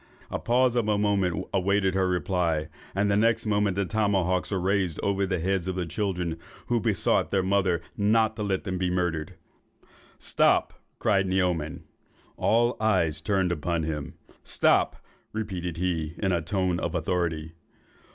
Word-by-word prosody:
A - - -2
pause 125 +1 +2
of 120 -3 +1
a 105 -1 +2
moment 95 -3 +1
awaited 95 0 +2
her 95 -1 +2
reply, 90 -4 0 0.3
and 100 +1 +2
the - - +3
next 115 +2 +2
moment 105 -2 +1
the 100 0 0
tomahawks 95 -3 +1
were 100 - -1
raised 95 -2 0
over 100 -1 +1
the 95 -1 0
heads 95 +1 -1
of 95 - -2
the 90 -1 -2
children, 90 -2 -2 0.3
who 120 -1 +1
besought 110 -3 +1
their 95 -2 +1
mother 95 -3 +1
not 110 +2 +2
to 110 - -5
let 100 -2 -1
them 95 -3 -3
be 90 -1 0
murdered. 90 -1 -1 0.8
"'Stop!' - - +2 0.2
cried 100 -3 +2
Naoman. 90 -5 0 0.5
All 120 +2 +2
eyes 95 -8 +1
were - - -32
turned 95 -3 +2
upon 85 0 -1
him. 75 0 -4 0.3
'Stop!' - - +2 0.4
repeated 95 -6 -4
he 85 -3 -2
in 95 -2 0
a 85 -2 +1
tone 90 +1 0
of 85 -2 -3
authority. 80 -2 -1
95 Hz, 160 wpm, -27 LUFS, 85-100 Hz, 0.8 s, the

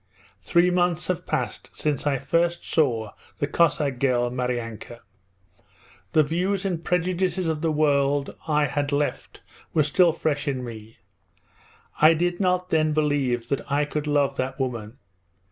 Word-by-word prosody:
'Three 170 - +3
months 175 -1 +1
have 180 - -2
passed - - -3
since 150 -2 -1
I 140 -2 +2
first 170 +6 0
saw 115 -9 +1 0.3
the - - 0
Cossack 145 -4 +1
girl, 120 -2 +1
Maryanka. 120 -2 -4 1.2
The 155 - +5
views 180 +6 -1
and 175 -4 -2
prejudices 180 +1 0
of 155 -2 -1
the 165 -1 +1
world 145 -2 +1
I 150 -1 +2
had 145 +1 -2
left 145 0 -2 0.3
were 155 - +5
still 170 +4 +4
fresh 155 -2 -2
in 130 -3 -1
me. 110 -2 -9 1.0
I 155 +2 +7
did 175 +2 -1
not 180 -1 +1
then 155 -1 +2
believe 140 -6 0
that 140 - 0
I 145 +1 +2
could 150 0 -4
love 145 -1 +1
that 130 +2 -3
woman. 120 -4 -4
150 Hz, 145 wpm, -24 LUFS, 135-170 Hz, 1.2 s, I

